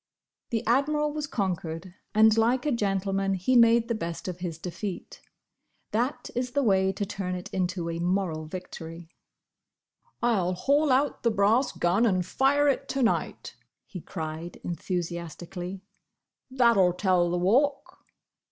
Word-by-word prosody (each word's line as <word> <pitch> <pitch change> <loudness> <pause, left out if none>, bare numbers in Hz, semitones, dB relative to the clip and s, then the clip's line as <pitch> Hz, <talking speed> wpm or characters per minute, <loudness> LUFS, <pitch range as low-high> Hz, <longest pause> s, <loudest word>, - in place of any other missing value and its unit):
The 225 -2 -2
Admiral 295 +5 +1
was 300 -1 -3
conquered, 180 - -3 0.2
and 220 0 +6
like 240 +4 +2
a 300 - +1
gentleman, 195 -3 0
he 190 +8 +1
made 230 -1 +5
the 235 - 0
best 170 -6 -5
of 180 -1 -5
his 175 -3 -4
defeat. 180 +3 -6 0.7
That 245 +6 -1
is 245 0 -2
the 285 0 +2
way 190 -4 +3
to 200 +1 -3
turn 190 -2 -4
it 180 - -8
into 180 -2 -1
a 165 0 -3
moral 175 -3 -1
victory. 165 -1 -8 1.1
"I 235 -3 +2
'll 180 +1 0
haul 285 - +2
out 275 +3 +1
the 235 - +2
brass 220 +5 +2
gun 190 +7 +2
and 185 -4 +1
fire 280 +8 +2
it 275 - 0
to 270 -2 0
night!" 230 - -1 0.3
he 180 - -8
cried, 160 0 -6
enthusiastically. 175 +1 -5 0.7
"That'll 235 -8 +4
tell 180 -2 +2
the 175 - 0
Walk!" 265 +11 +1
195 Hz, 145 wpm, -27 LUFS, 175-240 Hz, 1.1 s, and